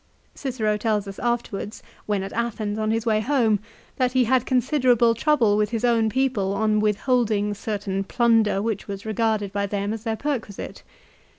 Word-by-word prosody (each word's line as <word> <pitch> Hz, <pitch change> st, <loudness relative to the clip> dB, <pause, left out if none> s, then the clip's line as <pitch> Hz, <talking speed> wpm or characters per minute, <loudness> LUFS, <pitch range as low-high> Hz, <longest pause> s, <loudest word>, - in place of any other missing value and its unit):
Cicero 225 Hz, -6 st, -1 dB
tells 210 Hz, -2 st, 0 dB
us 195 Hz, -, -8 dB
afterwards 235 Hz, -3 st, -3 dB, 0.2 s
when 205 Hz, -2 st, 0 dB
at 195 Hz, -, -6 dB
Athens 220 Hz, -2 st, -2 dB
on 215 Hz, 0 st, 0 dB
his 225 Hz, +1 st, 0 dB
way 215 Hz, -2 st, +2 dB
home, 225 Hz, -4 st, +2 dB, 0.4 s
that 255 Hz, -1 st, +1 dB
he 260 Hz, -1 st, +4 dB
had 255 Hz, +1 st, +1 dB
considerable 250 Hz, -3 st, +3 dB
trouble 230 Hz, -4 st, +2 dB
with 210 Hz, -1 st, +1 dB
his 230 Hz, +1 st, -1 dB
own 230 Hz, -2 st, +3 dB
people 220 Hz, -6 st, 0 dB
on 215 Hz, +1 st, +2 dB
withholding 210 Hz, -1 st, +1 dB
certain 200 Hz, -2 st, -3 dB
plunder 225 Hz, -3 st, +2 dB
which 220 Hz, -3 st, -3 dB
was 200 Hz, 0 st, -6 dB
regarded 215 Hz, -2 st, 0 dB
by 200 Hz, 0 st, -1 dB
them 200 Hz, +1 st, -2 dB
as 225 Hz, -1 st, -6 dB
their 225 Hz, -2 st, -1 dB
perquisite. 245 Hz, -8 st, -4 dB
220 Hz, 170 wpm, -24 LUFS, 205-240 Hz, 0.4 s, he